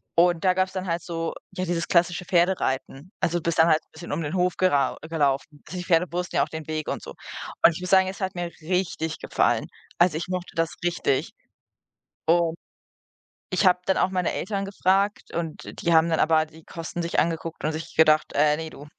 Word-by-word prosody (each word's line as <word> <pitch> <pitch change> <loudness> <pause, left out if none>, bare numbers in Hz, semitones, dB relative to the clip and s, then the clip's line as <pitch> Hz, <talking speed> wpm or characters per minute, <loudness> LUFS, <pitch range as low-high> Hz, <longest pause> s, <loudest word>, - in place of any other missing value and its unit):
und 175 0 +3
da 185 -1 +4
gab's 185 0 0
dann 185 -1 -3
halt 170 0 -1
so, 165 -1 -3 0.2
ja, 185 - -4
dieses 170 -2 -1
klassische 175 0 +2
Pferdereiten. 170 -3 0
Also, 170 +1 +1
du - - -13
bist 170 -1 0
dann 160 - +7
halt 155 -1 +5
'n - - -41
bisschen 170 +2 -9
um - - -1
den 150 0 -3
Hof 180 0 +1
gerau 145 -8 +2
gelaufen. 145 -1 -1
Also, 180 - -6
die 180 - -5
Pferde 170 -1 +3
wussten 180 +1 -3
ja - - +4
auch - - -5
den 160 -1 -7
Weg 155 -1 -3
und - - -3
so. - - -9 0.5
Und - - +8
ich 160 - -6
muss 180 - -4
sagen, 190 -1 +5
es 190 - -8
hat 190 -1 -2
mir 175 -1 -3
richtig 165 -2 -2
gefallen. - - +1 0.3
Also, 175 -3 +4
ich 165 - -4
mochte 180 -1 -4
das 165 0 0
richtig. 175 -6 0 1.0
Und 170 0 +3 1.0
ich 185 - +2
habe 180 -1 +5
dann 190 - +2
auch - - +3
meine 180 -2 0
Eltern 195 0 -2
gefragt, 195 +1 0
und 165 -2 -4 0.2
die 170 - +2
haben 160 0 +6
dann 160 - +1
aber 155 0 +3
die 160 +1 -17
Kosten 165 +1 -5
sich 170 0 0
angeguckt 165 0 -1
und 155 - +1
sich 160 +1 -7
gedacht: 155 -1 +5
„Äh, 150 +1 +4
ne, 160 0 -5
du.“ 145 -1 -12
170 Hz, 220 wpm, -25 LUFS, 160-180 Hz, 1.0 s, Und